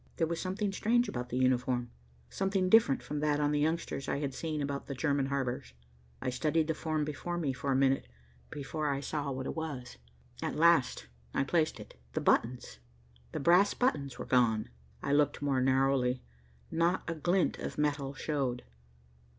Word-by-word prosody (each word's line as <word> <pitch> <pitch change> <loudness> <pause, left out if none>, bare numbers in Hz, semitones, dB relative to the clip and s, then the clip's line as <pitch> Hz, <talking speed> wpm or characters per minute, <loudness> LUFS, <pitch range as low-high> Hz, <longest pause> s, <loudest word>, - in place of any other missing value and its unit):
There 165 - +2
was 165 +1 -3
something 195 +2 -1
strange 240 +4 +2
about 125 -9 -4
the 125 - -2
uniform, 125 -1 +1 0.4
something 195 -1 0
different 215 -10 +5
from 150 - -4
that 150 0 +1
on 145 0 +2
the 150 - +1
youngsters 160 -2 -1
I - - 0
had 140 -2 -2
seen 155 +1 -3
about 140 0 -3
German 140 -2 +1
harbors. 130 - -2 0.5
I 125 - 0
studied 155 +5 +1
the - - +3
form 155 -1 -1
before 165 +4 -4
me 150 -6 0
for 135 +1 -2
a - - +3
minute 135 - +2 0.4
before 150 +1 -3
I 140 -1 0
saw 145 0 -3
what 130 -1 -4
it - - -4
was. 145 - -5 0.4
At - - -2
last 160 - +4 0.3
I - - +3
placed 155 +3 +1
it. - - -12
The - - -1
buttons, 120 - +1 0.5
the - - -3
brass 180 +7 +5
buttons 140 - 0
were - - -5
gone. 115 -4 +2 0.3
I 140 - 0
looked 145 0 +3
more 140 -2 +1
narrowly. 130 -1 +2 0.5
Not 170 +3 +1
a 165 - -1
glint 175 +4 +1
of - - -5
metal 145 -2 0
showed. 135 -5 -2
145 Hz, 175 wpm, -31 LUFS, 130-160 Hz, 0.5 s, different